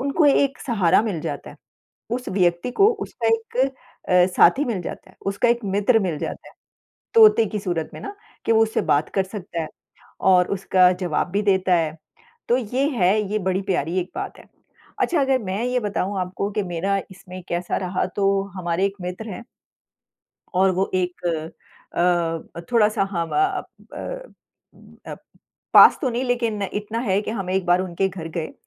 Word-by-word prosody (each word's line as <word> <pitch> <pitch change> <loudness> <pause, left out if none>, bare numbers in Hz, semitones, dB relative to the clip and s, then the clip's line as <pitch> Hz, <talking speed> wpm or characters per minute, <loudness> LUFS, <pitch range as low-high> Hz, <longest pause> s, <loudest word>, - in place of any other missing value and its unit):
उनको 280 +4 +2
एक 280 -1 +3
सहारा 205 -7 +3
मिल 205 -8 -3
जाता - - -5
है, - - -14 0.6
उस 250 +1 -3
व्यक्ति 180 +3 +1
को 395 +11 +4 0.2
उसका 230 -2 -3
एक 225 +1 -1 0.5
अ, 180 -1 +6
साथी 260 +12 +5
मिल 215 -7 -2
जाता 180 - -8
है, 185 - -20
उसका 200 +4 +1
एक 235 - +2
मित्र 205 +4 +2
मिल 175 -6 -2
जाता - - -6
है। - - -21 0.6
तोते 435 - +7
की 210 0 -4
सूरत 175 -5 -3
में - - -8
ना 405 - -7 0.3
कि - - +2
वो 225 0 +5
उससे 220 0 -1
बात 145 +2 +2
कर 195 - +3
सकता 185 -4 -6
है 155 - -4 0.6
और 180 -1 +5
उसका 185 -1 +4
जवाब 175 0 -1
भी 205 +3 0
देता 190 -2 +2
है। 160 -2 -1 0.5
तो 240 - +4
ये 255 +4 -1
है, 210 -5 +2
ये 215 - +1
बड़ी 190 0 -1
प्यारी 180 -2 -1
एक 180 - -6
बात 390 +1 -5
है। - - -14 0.6
अच्छा 340 -4 +2
अगर 270 -1 +2
मैं 195 +3 -3
ये 250 0 0
बताऊँ 200 -2 -2
आपको 185 +2 -3
कि 210 0 -1
मेरा 190 +2 -1
इसमें 185 -1 -11
कैसा 175 +1 -2
रहा, 185 -1 -1
तो 195 +1 +1
हमारे 175 +1 -1
एक 200 - -4
मित्र 180 +5 -6
हैं 235 - -7 1.1
और 190 +1 +4
वो 190 +1 0
एक 180 -1 -2 0.7
अ - - -2 0.6
अ, - - -6
थोड़ा-सा 215 -4 +3
हाँ 170 -2 -1
ब - - -6
अ, 385 -1 +1 0.3
ब - - -7 0.7
अ, - - -5 0.6
पास - - +9
तो 265 - +1
नहीं 240 +2 -2
लेकिन 235 -4 -1
इतना 210 +2 -3
है 205 -4 +1
कि 215 - -5
हम 195 -5 -4
एक 190 -1 0
बार 175 +1 +3
उनके 185 +1 -1
घर 175 -4 -7
गए 160 - -4
195 Hz, 185 wpm, -22 LUFS, 180-230 Hz, 1.1 s, पास